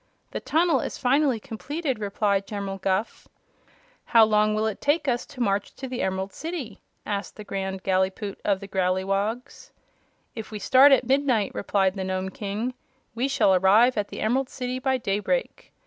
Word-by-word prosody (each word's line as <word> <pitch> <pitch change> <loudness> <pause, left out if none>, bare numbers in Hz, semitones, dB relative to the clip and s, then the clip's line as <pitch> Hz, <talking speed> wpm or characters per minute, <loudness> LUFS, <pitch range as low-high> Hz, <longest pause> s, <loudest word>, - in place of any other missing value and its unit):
"The - - -3
tunnel 335 +1 +2
is - - -4
finally 270 -1 +2
completed," 275 +3 -4
replied 200 -1 0
General 200 -2 -5
Guph. 190 +3 -2 0.8
"How 230 -1 +6
long 215 0 +2
will 215 +1 0
it 220 -3 -3
take 290 +2 +1
us 245 -2 0
to 280 -4 -9
march 200 -3 0
to 265 - -6
the 255 -1 -4
Emerald 190 +1 -2
City?" 310 - -6 0.2
asked 200 -2 -4
the 210 - -9
Grand 190 -1 -4
Gallipoot 190 +2 -1
of 200 -1 +1
the 200 - -7
Growleywogs. 195 +6 -2 0.6
"If 225 -2 -7
we 215 - -6
start 265 +7 +6
at 265 -2 +5
midnight," 260 -5 +1
replied 195 -2 +1
the 190 -1 -4
Nome 185 0 -2
King, 210 +5 -4 0.4
"we 245 +3 0
shall 270 -8 +3
arrive 205 +7 +5
at 205 -1 -1
the - - -7
Emerald 255 +4 +1
City 255 0 -4
by 265 0 +1
daybreak. 230 - -2
215 Hz, 170 wpm, -25 LUFS, 195-255 Hz, 0.8 s, How